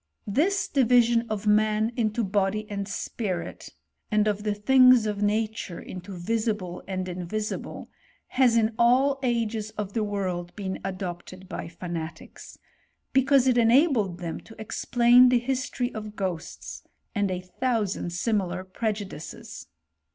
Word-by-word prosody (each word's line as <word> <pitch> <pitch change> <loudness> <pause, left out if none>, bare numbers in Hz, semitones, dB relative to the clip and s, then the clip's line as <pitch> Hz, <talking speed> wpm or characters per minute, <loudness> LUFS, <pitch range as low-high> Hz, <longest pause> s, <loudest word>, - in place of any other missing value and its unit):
This 365 - +1
division 240 -3 +3
of 215 -1 -3
man 215 +1 +3
into 225 -1 0
body 200 +1 0
and 200 -1 -3
spirit, 195 -1 -4 0.4
and 215 -1 +2
of 210 -1 0
the 210 -1 -1
things 255 +2 +6
of 210 -1 -2
nature 215 -3 -1
into 185 +1 -8
visible 210 -2 -2
and 185 -1 -3
invisible, 185 +4 -4 0.4
has 250 -3 +4
in 220 -1 +3
jjl 265 +4 +4
ages 230 -4 -1
of 205 -2 -4
the 225 - 0
world, 185 -4 -3
been 190 -2 -4
adopted 185 0 -6
by - - -5
fanatics, 170 -1 -7 0.6
be 265 - +5
eause 275 -2 +4
it 245 -2 +4
enabled 230 - +3
them 170 -2 -5
to 225 - -15
explain 245 +3 +4
the 250 - +4
history 250 0 -2
of 215 -1 -7
ghosts, 185 -5 -5 0.3
a^id 205 -1 +1
a 185 0 -4
thousand 225 -8 0
similar 185 -1 -1
prejudices. 210 +1 -5
215 Hz, 135 wpm, -26 LUFS, 190-235 Hz, 0.6 s, things